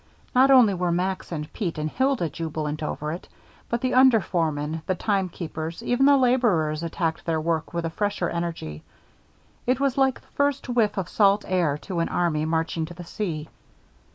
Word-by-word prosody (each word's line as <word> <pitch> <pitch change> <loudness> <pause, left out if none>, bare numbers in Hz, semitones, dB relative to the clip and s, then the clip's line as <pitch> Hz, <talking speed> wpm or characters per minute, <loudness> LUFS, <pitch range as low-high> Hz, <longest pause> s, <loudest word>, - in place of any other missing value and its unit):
Not 260 +1 +5
only 250 -7 +7
were 180 -1 0
Max 185 +2 -2
and 150 -2 -5
Pete 175 -6 -3
and 155 0 -1
Hilda 260 - +1
jubilant 155 -1 -4
over 150 0 -3
it, 170 - -7 0.4
but 235 0 -1
the 255 - 0
under 255 -3 +6
foremen, 160 -4 -2
the 185 - +1
timekeepers, 175 -3 -3
even 245 +3 +3
the 285 -1 +6
laborers 220 - +2
attacked 165 -1 -2
their 165 -1 0
work 160 0 -1
with 170 -1 -2
a 165 - -2
fresher 205 -1 -1
energy. 165 - -4 0.9
It 255 +2 +2
was 275 -1 +1
like 265 -1 +2
the - - -26
first 285 -1 0
whiff 225 -5 +1
of 190 -3 -1
salt 200 +1 +3
air 170 -6 +1
to 180 -3 -3
an 165 - 0
army 155 -3 0
marching 160 0 -1
to 175 +2 -10
the 175 0 -9
sea. 165 -5 -4
175 Hz, 180 wpm, -25 LUFS, 160-230 Hz, 0.9 s, only